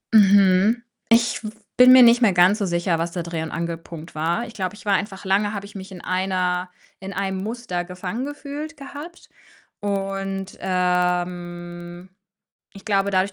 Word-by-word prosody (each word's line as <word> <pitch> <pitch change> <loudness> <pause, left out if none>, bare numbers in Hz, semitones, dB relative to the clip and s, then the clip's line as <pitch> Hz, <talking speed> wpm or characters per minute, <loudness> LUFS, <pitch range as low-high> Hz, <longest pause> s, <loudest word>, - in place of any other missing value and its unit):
Mhm. 200 +2 +5 0.3
Ich 235 0 +3 0.3
bin 250 0 +8
mir 255 -1 +9
nicht 240 +1 +6
mehr 215 -5 +4
ganz 180 +4 +4
so 200 - 0
sicher, 170 -1 0
was 170 +1 -2
da 175 -2 -3
der 170 - -9
Dreh 165 -2 -2
und 160 - -5
Angelpunkt 165 -1 -6
war. 165 +9 -1
Ich 230 - -11
glaube, 185 -1 -3
ich 210 - -15
war 205 - +2
einfach 195 0 -2
lange 205 +2 +1
habe 200 - -5
ich 200 - -13
mich 190 0 -8
in 180 -2 -9
einer 185 -1 -1 0.3
in 195 +1 -7
einem 190 0 -2
Muster 220 -5 -3
gefangen 180 +6 -5
gefühlt 290 +2 -7
gehabt 290 +5 -10 0.5
und, 195 -1 -3
ähm, 175 -1 -2 0.6
ich 195 - -13
glaube, 200 -1 +1
dadurch, 190 +1 +1
190 Hz, 170 wpm, -22 LUFS, 180-210 Hz, 0.6 s, mir